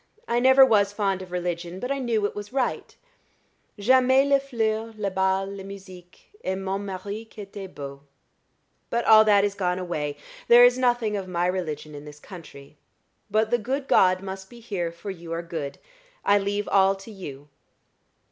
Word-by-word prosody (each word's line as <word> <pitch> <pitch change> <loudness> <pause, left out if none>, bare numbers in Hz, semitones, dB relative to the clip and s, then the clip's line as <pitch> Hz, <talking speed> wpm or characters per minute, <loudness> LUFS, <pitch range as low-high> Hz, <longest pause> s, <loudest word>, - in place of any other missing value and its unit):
I 240 - +1
never 265 +2 +7
was 200 -5 +3
fond 195 -2 -1
of 185 -1 -10
religion, 175 0 -4
but 250 +5 -4
I 275 - -1
knew 230 -5 0
it - - -2
was 205 +1 -8
right. 260 -2 -2 0.8
J'aimais 260 +5 +4
les 280 0 +4
fleurs, 225 -4 -2
les 200 -2 -2
bals, 190 +1 +1
la 195 - -8
musique, 185 -2 -13
et 190 - -1
mon 195 0 -3
mari 200 +2 -6
qui 220 -1 -12
était 195 -1 -9
beau. 140 -1 -8 0.9
But 235 0 -1
all 220 0 +8
that 205 -2 +5
is 205 -1 0
gone 180 -3 -1
away. 150 -5 -3 0.3
There 240 +1 +8
is 245 0 +5
nothing 240 -4 +1
of 195 -2 -4
my 175 -1 -1
religion 165 -5 -3
in 145 0 -9
this 150 0 -12
country. 150 -5 -13 0.5
But 220 +1 +1
the 240 - +3
good 265 +5 -3
God 185 0 +4
must 190 0 -7
be 240 - -13
here, 190 -7 -3
for 170 +4 -7
you 170 -3 -10
are 165 +1 -3
good; 160 -4 -5 0.5
I 205 0 +5
leave 205 +1 -2
all 195 0 +4
to 195 +3 -12
you." 145 -8 -9
195 Hz, 185 wpm, -25 LUFS, 180-220 Hz, 0.9 s, all